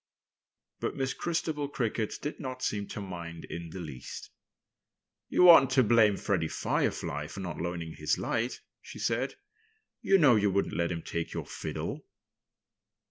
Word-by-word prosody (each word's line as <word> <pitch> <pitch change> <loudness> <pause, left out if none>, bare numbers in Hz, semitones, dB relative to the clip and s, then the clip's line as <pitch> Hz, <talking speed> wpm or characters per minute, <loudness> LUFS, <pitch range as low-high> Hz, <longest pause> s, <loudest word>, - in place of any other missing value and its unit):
But - - -2
Miss 135 -1 -1
Christabel 160 -4 -2
Cricket 115 -6 -1
did 150 - -4
not 130 -3 -5
seem 100 -1 -1
to - - -6
mind 85 -4 -7
in 85 0 -6
the 95 - -7
least. 75 -8 -8 1.0
"You 180 - +6
oughtn't 145 -6 +9
to 130 -1 +6
blame 105 -3 +5
Freddie 90 -6 0
Firefly 75 -1 -1
for 100 - -8
not 85 -4 -5
loaning 85 -2 -4
his 75 - 0
light," 120 +3 -2 0.2
she - - -10
said. - - -1 0.7
"You 195 - +5
know 140 -9 +6
you 105 -1 +3
wouldn't 100 +1 0
let 85 0 0
him 85 -1 -4
take 85 -1 -3
your - - -4
fiddle." - - -5
100 Hz, 155 wpm, -30 LUFS, 85-130 Hz, 1.0 s, oughtn't